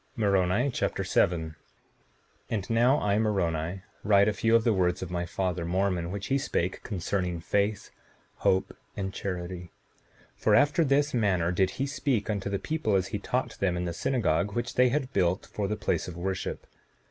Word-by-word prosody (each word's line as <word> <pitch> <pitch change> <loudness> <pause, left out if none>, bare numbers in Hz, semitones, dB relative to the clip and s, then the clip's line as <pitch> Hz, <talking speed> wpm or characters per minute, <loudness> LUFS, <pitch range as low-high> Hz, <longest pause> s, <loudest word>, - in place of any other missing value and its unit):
Moroni 100 +3 +2
Chapter - - -1
7 80 -2 +1
7:1 - - -16 1.0
And 100 -4 -2
now 120 +5 +4
I, 105 0 +1
Moroni, 90 -4 -1 0.2
write 100 -1 +5
a 105 - +2
few 115 +2 +2
of 115 - +4
the 115 - +3
words 90 -2 +1
of 90 - -7
my 85 -1 -2
father 90 -1 -2
Mormon, 90 0 0
which 100 +1 -4
he 135 +1 +1
spake 90 -8 -2
concerning 90 -3 -2
faith, 100 +4 -1 0.5
hope, 95 0 +1 0.2
and 95 -1 -3
charity; 90 -2 -5 0.7
for - - +3
after 150 +4 +4
this 145 +1 +2
manner 95 -8 +2
did 95 +1 +2
he 135 - 0
speak 135 -7 -1
unto 100 -1 -2
the 100 - 0
people, 155 -6 -1
as 95 0 +1
he 105 - -3
taught 125 +5 -2
them 90 -3 +1
in 90 - -2
the 85 - -3
synagogue 100 -3 0
which 120 +2 -2
they 125 0 +4
had 135 0 -2
built 90 0 +1
for 100 -2 -3
the 105 - -1
place 105 - -1
of 90 -1 -7
worship. 95 +1 -3
100 Hz, 180 wpm, -28 LUFS, 90-115 Hz, 1.0 s, write